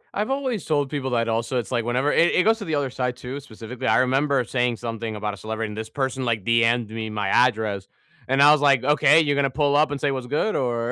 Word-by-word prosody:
I've 210 Hz, +3 st, -2 dB
always 265 Hz, -6 st, -2 dB
told 145 Hz, -3 st, 0 dB
people 140 Hz, -3 st, -3 dB
that 115 Hz, -1 st, 0 dB
also, 115 Hz, +3 st, -1 dB
it's 120 Hz, -, -4 dB
like, 120 Hz, -2 st, -1 dB
whenever 130 Hz, +5 st, 0 dB
it 170 Hz, -, +3 dB
it 180 Hz, -, +3 dB
goes 225 Hz, +2 st, +2 dB
to 205 Hz, -, -6 dB
the 160 Hz, -, -2 dB
other 140 Hz, -3 st, -2 dB
side 125 Hz, -1 st, -3 dB
too, 130 Hz, +3 st, -7 dB
specifically, 115 Hz, -2 st, -8 dB
I 110 Hz, -, +3 dB
remember 135 Hz, +1 st, +1 dB
saying 120 Hz, -1 st, -1 dB
something 115 Hz, -1 st, -5 dB
about 105 Hz, 0 st, -4 dB
a -, -, -9 dB
celebrity, 110 Hz, +2 st, -4 dB
and 105 Hz, -, -9 dB
this 110 Hz, 0 st, -6 dB
person 135 Hz, -1 st, -3 dB
like 115 Hz, -5 st, -1 dB
DM'ed 115 Hz, -1 st, +2 dB
me 110 Hz, 0 st, -5 dB
my 105 Hz, 0 st, -3 dB
address, 110 Hz, -5 st, +1 dB, 0.4 s
and 135 Hz, +1 st, +2 dB
I 145 Hz, +1 st, +8 dB
was 150 Hz, -1 st, +3 dB
like, 140 Hz, -4 st, +3 dB
"Okay, 150 Hz, +1 st, +4 dB
you're 145 Hz, -2 st, 0 dB
gonna 140 Hz, -1 st, +1 dB
pull 145 Hz, +1 st, 0 dB
up 150 Hz, +1 st, +3 dB
and 145 Hz, -, -3 dB
say 145 Hz, 0 st, 0 dB
what's 130 Hz, -2 st, -5 dB
good, 150 Hz, -, -1 dB
or?" 120 Hz, -2 st, -1 dB
130 Hz, 260 wpm, -23 LUFS, 115-145 Hz, 0.4 s, I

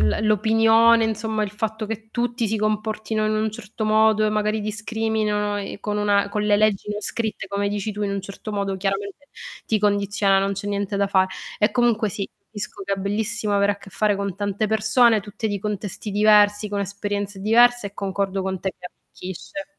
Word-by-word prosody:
l 215 Hz, -, +1 dB
l'opinione, 225 Hz, +2 st, +5 dB
insomma 220 Hz, 0 st, -1 dB
il 200 Hz, -, -5 dB
fatto 220 Hz, +1 st, -3 dB
che 220 Hz, 0 st, -6 dB
tutti 240 Hz, -1 st, -1 dB
si 220 Hz, -, 0 dB
comportino 215 Hz, +1 st, -1 dB
in 215 Hz, -, 0 dB
un 215 Hz, 0 st, 0 dB
certo 220 Hz, -1 st, -6 dB
modo 215 Hz, 0 st, +4 dB
e 215 Hz, -, +2 dB
magari 215 Hz, 0 st, 0 dB
discriminano 215 Hz, -1 st, -1 dB
e 200 Hz, 0 st, -6 dB
con 210 Hz, 0 st, -3 dB
una 205 Hz, -1 st, +2 dB
con 210 Hz, 0 st, -1 dB
le 210 Hz, -1 st, +3 dB
leggi 210 Hz, -1 st, +1 dB
non 210 Hz, 0 st, -3 dB
scritte 220 Hz, -3 st, -3 dB
come 200 Hz, +1 st, -1 dB
dici 205 Hz, +1 st, -3 dB
tu 210 Hz, +1 st, -4 dB
in 200 Hz, -, -1 dB
un 200 Hz, 0 st, -2 dB
certo 200 Hz, +3 st, -8 dB
modo 200 Hz, -1 st, -1 dB
chiaramente 200 Hz, +7 st, -3 dB, 0.4 s
ti 220 Hz, -, +1 dB
condiziona, 200 Hz, -1 st, +2 dB
non 195 Hz, +1 st, 0 dB
c'è 195 Hz, +1 st, -6 dB
niente 200 Hz, 0 st, -2 dB
da 200 Hz, 0 st, +2 dB
fa 190 Hz, -1 st, +3 dB, 0.3 s
e 210 Hz, -, +3 dB
comunque 235 Hz, -3 st, +2 dB
sì, 195 Hz, 0 st, -4 dB, 0.2 s
capisco 205 Hz, -1 st, -7 dB
che 200 Hz, +1 st, -1 dB
è -, -, -11 dB
bellissimo 210 Hz, +2 st, -1 dB
avere 200 Hz, 0 st, +3 dB
a -, -, -9 dB
che 200 Hz, -, -14 dB
fare 210 Hz, +1 st, +1 dB
con 200 Hz, -1 st, -3 dB
tante 205 Hz, +1 st, -1 dB
persone, 220 Hz, +1 st, +4 dB
tutte 205 Hz, +2 st, -5 dB
di 205 Hz, -2 st, -2 dB
contesti 210 Hz, 0 st, -4 dB
diversi, 210 Hz, 0 st, +4 dB
con 205 Hz, -, -1 dB
esperienze 200 Hz, 0 st, -3 dB
diverse 235 Hz, +1 st, +4 dB
e 200 Hz, -, -23 dB
concordo 195 Hz, -1 st, -2 dB
con 190 Hz, 0 st, -2 dB
te 190 Hz, -, -1 dB
che 180 Hz, -, -9 dB
arricchisce. 190 Hz, -, -9 dB
210 Hz, 200 wpm, -23 LUFS, 200-220 Hz, 0.4 s, l'opinione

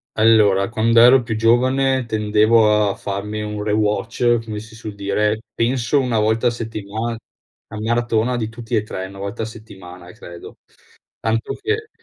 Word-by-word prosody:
Allora, 105 Hz, -3 st, +4 dB
quand'ero 115 Hz, +3 st, +5 dB
più 115 Hz, -2 st, -4 dB
giovane 130 Hz, +3 st, +2 dB
tendevo 105 Hz, -1 st, +3 dB
a -, -, -3 dB
farmi 105 Hz, +2 st, -5 dB
un 105 Hz, 0 st, -4 dB
rewatch, 110 Hz, +3 st, +1 dB
come 110 Hz, -2 st, -6 dB
si 110 Hz, +1 st, -12 dB
su 110 Hz, -1 st, -7 dB
dire, 105 Hz, +2 st, 0 dB
penso 120 Hz, +2 st, +1 dB
1 125 Hz, -4 st, 0 dB
volta 110 Hz, +3 st, +1 dB
a -, -, +5 dB
settimana 110 Hz, 0 st, -5 dB, 0.5 s
la 110 Hz, -, -8 dB
maratona 120 Hz, +1 st, 0 dB
di 110 Hz, -3 st, -3 dB
tutti 115 Hz, +1 st, -5 dB
e 110 Hz, -, +2 dB
3, 95 Hz, -3 st, -6 dB
1 95 Hz, +1 st, -11 dB
volta 100 Hz, +3 st, -4 dB
a -, -, -2 dB
settimana 90 Hz, -5 st, -12 dB
credo; 85 Hz, -1 st, -12 dB, 0.6 s
tanto 115 Hz, 0 st, -1 dB
che 435 Hz, +2 st, -2 dB
110 Hz, 155 wpm, -20 LUFS, 105-120 Hz, 0.6 s, quand'ero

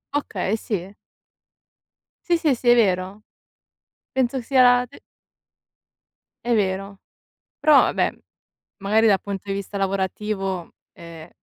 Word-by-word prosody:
Okay, 210 Hz, -8 st, -1 dB
sì. 200 Hz, -3 st, -5 dB, 1.3 s
Sì, 345 Hz, -1 st, +3 dB
sì, 315 Hz, -4 st, +2 dB
sì, 240 Hz, +1 st, 0 dB
è 240 Hz, -, +7 dB
vero. 195 Hz, -2 st, 0 dB, 0.9 s
Penso 260 Hz, 0 st, 0 dB
sia 255 Hz, +2 st, +3 dB
la 245 Hz, 0 st, +5 dB
d 265 Hz, -, -17 dB, 1.5 s
È 240 Hz, -, +1 dB
vero. 195 Hz, -1 st, -2 dB, 0.6 s
Però, 300 Hz, -1 st, +6 dB
vabbè, -, -, 0 dB, 0.7 s
magari, 215 Hz, +3 st, +2 dB
dal 195 Hz, -2 st, +3 dB
punto 200 Hz, -2 st, -6 dB
di 195 Hz, -, -3 dB
vista 200 Hz, +1 st, -6 dB
lavorativo, 195 Hz, -1 st, -2 dB, 0.2 s
ehm 165 Hz, -1 st, -12 dB
205 Hz, 115 wpm, -22 LUFS, 190-245 Hz, 1.5 s, è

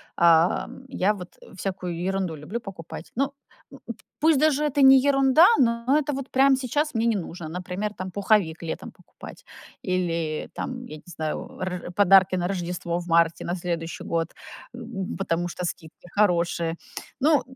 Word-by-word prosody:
а, 170 Hz, 0 st, +4 dB, 0.2 s
я 210 Hz, -4 st, +1 dB
вот 180 Hz, -3 st, -10 dB, 0.2 s
всякую 180 Hz, -3 st, -4 dB
ерунду 190 Hz, -4 st, -1 dB
люблю 165 Hz, +11 st, -5 dB
покупать. 180 Hz, -6 st, -9 dB
Ну, 275 Hz, +2 st, 0 dB, 0.4 s
э, -, -, -11 dB, 0.4 s
пусть 310 Hz, -3 st, +4 dB
даже 300 Hz, -1 st, +3 dB
это 285 Hz, -1 st, +1 dB
не 265 Hz, 0 st, +9 dB
ерунда, 275 Hz, +3 st, +5 dB
но 235 Hz, -1 st, +2 dB
это 295 Hz, -1 st, -2 dB
вот 270 Hz, 0 st, -5 dB, 0.3 s
сейчас 295 Hz, +4 st, -1 dB
мне 225 Hz, +1 st, +1 dB
не 225 Hz, -, +2 dB
нужно. 170 Hz, -3 st, -6 dB
Например, 180 Hz, +4 st, -4 dB
там, 185 Hz, -1 st, -6 dB
пуховик 190 Hz, -5 st, +1 dB
летом 160 Hz, -, -5 dB
покупать -, -, -14 dB, 0.4 s
или, 170 Hz, -4 st, -2 dB
там, 250 Hz, -1 st, -5 dB
я 155 Hz, -, -9 dB
не -, -, -17 dB
знаю, 155 Hz, -3 st, -5 dB
р 180 Hz, -1 st, -4 dB
подарки 190 Hz, -2 st, +5 dB
на 175 Hz, 0 st, -1 dB
Рождество 175 Hz, -2 st, -3 dB
в 175 Hz, -, -8 dB
марте, 165 Hz, 0 st, +2 dB
на 175 Hz, -, -2 dB
следующий 170 Hz, -2 st, -4 dB
год, 165 Hz, -1 st, 0 dB, 0.5 s
м, 230 Hz, -6 st, -5 dB
потому 175 Hz, -2 st, -1 dB
что 180 Hz, +1 st, -5 dB
скидки 165 Hz, +1 st, -7 dB
хорошие. 170 Hz, -4 st, +1 dB, 0.5 s
Ну, 300 Hz, -1 st, +4 dB
185 Hz, 155 wpm, -25 LUFS, 170-235 Hz, 0.5 s, не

